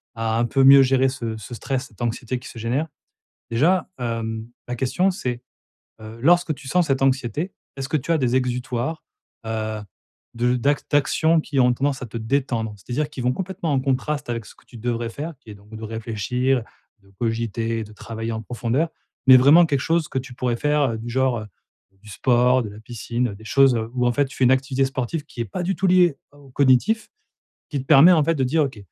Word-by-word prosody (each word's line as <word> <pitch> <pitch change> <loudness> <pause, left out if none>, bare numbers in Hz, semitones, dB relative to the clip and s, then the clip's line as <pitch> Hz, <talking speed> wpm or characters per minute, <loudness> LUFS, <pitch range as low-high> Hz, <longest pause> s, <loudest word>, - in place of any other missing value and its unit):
à 115 0 -1
un 120 - +2
peu 135 +3 +2
mieux 135 0 +9
gérer 130 0 +3
ce 115 -4 -5
ce 110 +3 -9
stress, 130 +4 -3
cette 105 - -16
anxiété 120 +1 -2
qui 125 - -11
se - - -12
génère. 120 +8 -1 0.6
Déjà, 165 +12 +2
hem, 115 -2 -3 0.2
la 125 - -3
question, 155 +10 +1
c'est, 125 -9 -4 0.6
heu, 110 +1 -10
lorsque 175 +2 +4
tu 135 -1 -12
sens 175 +4 +2
cette 135 -1 0
anxiété, 135 +6 0 0.2
est-ce 135 0 -5
que 160 - +2
tu 140 +4 -3
as 165 - +3
des 125 -2 +1
exutoires, 125 +3 -2 0.4
heu, 110 -1 -3 0.5
de 120 +1 +1
d'ac 140 +4 +1
d'actions 160 +3 +3
qui 145 -3 -2
ont 125 -1 +4
tendance 135 +2 -1
à - - -4
te 115 0 -7
détendre? 115 -2 -1
C'est-à-dire 125 +9 -3
qui 150 -4 -7
vont 125 +1 +1
complètement 180 -2 -3
en 135 - +2
contraste 140 +2 -1
avec 115 -2 -3
ce - - -13
que - - -25
tu 120 - -13
devrais 115 0 -2
faire, 150 +8 -6
qui 115 - -17
est - - -10
donc 105 +2 -14
de 110 - -8
réfléchir, 115 +3 -1 0.4
de 100 - -24
cogiter, 115 -1 -2
de 105 - -12
travailler 115 +1 -6
en 110 - -4
profondeur, 125 +7 -1 0.4
mais 130 - +10
vraiment 145 +7 +7
quelque 145 -4 0
chose 165 0 +1
que 130 - -1
tu 125 -1 -9
pourrais 120 -2 -1
faire, 145 -1 +1
heu, 110 - -4
du 115 +2 -7
genre, 130 -1 +1
heu, 110 - -8 0.6
du 105 - -13
sport, 125 +4 +2
de 105 - -6
la 105 +1 -11
piscine, 120 0 -3
des 110 - -15
choses 135 0 +4 0.2
où 125 -1 0
en - - +3
fait 145 +3 +2
tu 135 - -11
fais - - +1
une 125 - +5
activité 130 0 +1
sportive 135 +4 -3
qui 125 - -7
est - - -2
pas 105 - -5
du 190 +2 -1
tout 195 - 0
liée 180 -4 +4 0.2
au 145 -1 -18
cognitif, 140 - +2 0.6
qui 145 - -2
te - - -12
permet 155 +4 +8
en 160 -4 +4
fait 165 +3 +2
de 135 - 0
dire: 150 +5 +2
«OK, 130 -5 -7
130 Hz, 220 wpm, -22 LUFS, 115-145 Hz, 0.6 s, mais